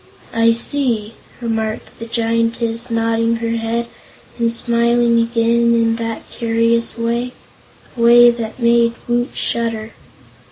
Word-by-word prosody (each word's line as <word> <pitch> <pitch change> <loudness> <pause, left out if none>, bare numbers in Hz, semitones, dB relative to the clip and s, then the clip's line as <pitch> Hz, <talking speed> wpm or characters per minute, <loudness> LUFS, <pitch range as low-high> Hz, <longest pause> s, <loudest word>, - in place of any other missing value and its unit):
"I 230 0 +3
see," 230 -3 -2 0.3
remarked 220 -2 -4
the 230 - -7
Giantess, 230 +1 -1
nodding 230 0 0
her 230 0 -2
head 230 +1 -2 0.5
and 230 -1 +1
smiling 235 0 +2
again 235 0 +2
in 230 0 +1
that 230 -1 -5
curious 230 0 0
way 235 +2 -2 0.6
a 235 - -5
way 240 +1 +7
that 230 -2 -6
made 235 -1 +3
Woot 240 0 0
shudder. 230 -1 -1
230 Hz, 120 wpm, -18 LUFS, 230-235 Hz, 0.6 s, way